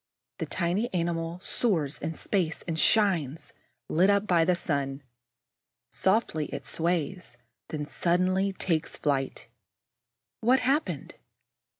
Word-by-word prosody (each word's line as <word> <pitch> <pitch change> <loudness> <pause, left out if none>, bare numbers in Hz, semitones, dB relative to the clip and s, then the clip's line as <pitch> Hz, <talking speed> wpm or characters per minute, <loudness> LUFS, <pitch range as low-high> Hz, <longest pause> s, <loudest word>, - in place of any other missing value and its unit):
The - - -2
tiny 185 +7 0
animal 170 0 -1
soars 165 - +1
in 160 +2 -3
space 175 -3 0
and 160 -2 -2
shines, 165 - +2 0.3
lit 180 +5 +3
up 200 0 +3
by 175 -5 +4
the 180 +2 +3
sun. 140 -5 -2 0.9
Softly 190 -6 +1
it - - -6
sways, 170 -3 -2 0.3
then 150 -1 -4
suddenly 185 +5 +1
takes 165 -4 -1
flight. 135 -3 -1 0.9
What 250 +3 +3
has - - -3
happened? 300 - -3
170 Hz, 115 wpm, -28 LUFS, 155-190 Hz, 0.9 s, by